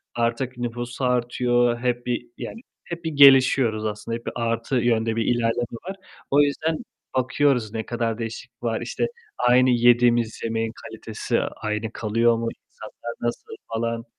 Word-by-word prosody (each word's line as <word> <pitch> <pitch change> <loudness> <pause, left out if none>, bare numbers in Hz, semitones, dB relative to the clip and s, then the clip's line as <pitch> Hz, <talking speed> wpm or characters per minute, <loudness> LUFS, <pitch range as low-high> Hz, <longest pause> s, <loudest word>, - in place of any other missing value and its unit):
artık 120 +2 -1
nüfus 120 +1 -4
artıyor, 120 -1 +2
hep 120 0 -1
bir, 120 -1 -2
yani 230 - -7 0.2
hep 170 0 -7
bir 160 - -2
gelişiyoruz 135 -6 +6
aslında, 105 +2 -3
hep 120 - -16
bir - - -4
artı 115 +2 -1
yönde 115 -2 +2
bir 115 -1 0
ilerleme 120 0 0
var. 195 - -5 0.4
O 140 +1 +6
yüzden 155 +2 0 0.4
bakıyoruz 130 -3 +1
ne 110 -1 -3
kadar 115 -2 -2
değişiklik 115 +1 -7
var, 115 -2 -1
işte 120 - -1 0.3
aynı 125 +1 +4
yediğimiz 120 -1 +3
yemeğin 115 0 -1
kalitesi - - -3
aynı 110 +1 -3
kalıyor 115 +2 +2
mu, 115 0 -2 0.2
insanlar 120 - -9
nasıl 120 - -3 0.2
falan... 115 0 -2
120 Hz, 150 wpm, -24 LUFS, 115-125 Hz, 0.4 s, gelişiyoruz